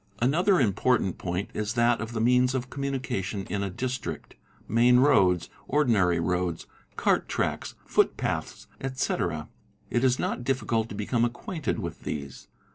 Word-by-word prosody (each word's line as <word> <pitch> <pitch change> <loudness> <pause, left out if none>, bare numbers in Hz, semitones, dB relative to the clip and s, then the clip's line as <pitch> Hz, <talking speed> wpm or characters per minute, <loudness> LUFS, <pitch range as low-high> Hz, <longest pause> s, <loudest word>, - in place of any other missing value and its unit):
Another 175 - +3
important 110 -3 +1
point 90 +2 -3
is 105 +2 -2
that 120 -1 +3
of 115 +1 -5
the 115 - -2
means 125 +3 +3
of 125 -1 -3
communication 130 -8 -3
in 100 - -1
a 100 - -1
Biistrict, 125 +6 -4 0.3
main 120 +2 +5
roads, 95 - +4 0.2
ordinary 110 - +3
roads, 90 0 -1 0.3
cart - - +1
tracks, - - -2
footpaths, - - 0
etc. 90 - -2 0.4
It 120 - +1
is 130 -1 +3
not 120 - -2
difficult 115 -3 0
to - - -6
become 115 +3 0
acquainted 135 +6 -2
with - - -5
these. 70 -3 -6
120 Hz, 140 wpm, -27 LUFS, 95-130 Hz, 0.4 s, main